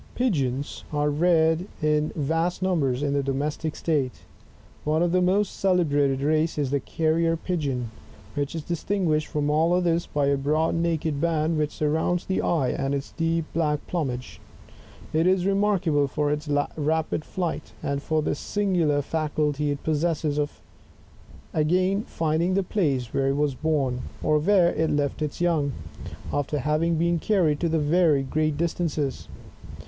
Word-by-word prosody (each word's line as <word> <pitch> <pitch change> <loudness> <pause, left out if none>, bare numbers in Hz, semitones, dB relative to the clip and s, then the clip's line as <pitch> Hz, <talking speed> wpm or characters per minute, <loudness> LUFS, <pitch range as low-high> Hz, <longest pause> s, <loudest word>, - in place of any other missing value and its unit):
Pigeons 140 - -1
are 150 0 +1
reared 165 +2 +2
in 150 0 +1
vast 165 +5 -1
numbers 145 -8 +1
in 140 -1 0
the 140 - +2
domestic 145 +3 -2
state; 145 -6 -1 0.6
one 155 +2 +1
of 175 - +1
the 185 +1 +3
most 195 +3 +1
celebrated 145 -8 +2
races 155 +2 +1
is 140 -3 0
the 140 - +2
Carrier 165 +3 +1
Pigeon^ 145 -8 -2 0.5
which 145 +1 -2
is 160 - -4
^stinguished 170 -2 0
from 150 0 -1
all 160 +3 +3
others, 170 -2 +1
by 145 -1 0
a 140 0 +2
broad 155 +4 +1
naked 165 -3 -1
band 160 -1 +1
which 150 -1 0
surrounds 160 +4 0
the 190 - 0
eye, 150 -7 +1
and 135 +1 -1
its 140 0 -5
deep 165 -1 0
black 150 -3 0
plumage; 130 -8 -4 0.7
it 160 +3 +3
is 185 -1 +3
remark 200 -1 +2
able 145 -3 +2
for 145 +2 -1
its 150 0 -3 0.3
rapid 160 +1 0
flight, 170 -4 -4
and 140 0 -1
for 155 0 0
the - - 0
singular 170 -5 0
faculty 150 -1 -1
it 145 -1 -3
possesses 155 -1 0
of 145 0 -3 0.9
again 185 +6 +2
finding 165 +3 0
the 195 - +2
place 140 - -1
where 135 0 +1
it 135 - +1
was 145 -1 +1
born, 135 -4 0 0.2
or 155 0 +3
where 175 +1 +4
it 160 0 0
left 145 0 -1
its 150 -1 -3
young, 155 -5 +1 0.6
after 145 +1 -1
having 155 +4 +1
been 170 +1 +1
carried 165 -7 +2
to 170 - 0
very 160 -2 +3
great 155 +2 0
distances. 160 -4 -2
155 Hz, 155 wpm, -25 LUFS, 145-170 Hz, 0.9 s, where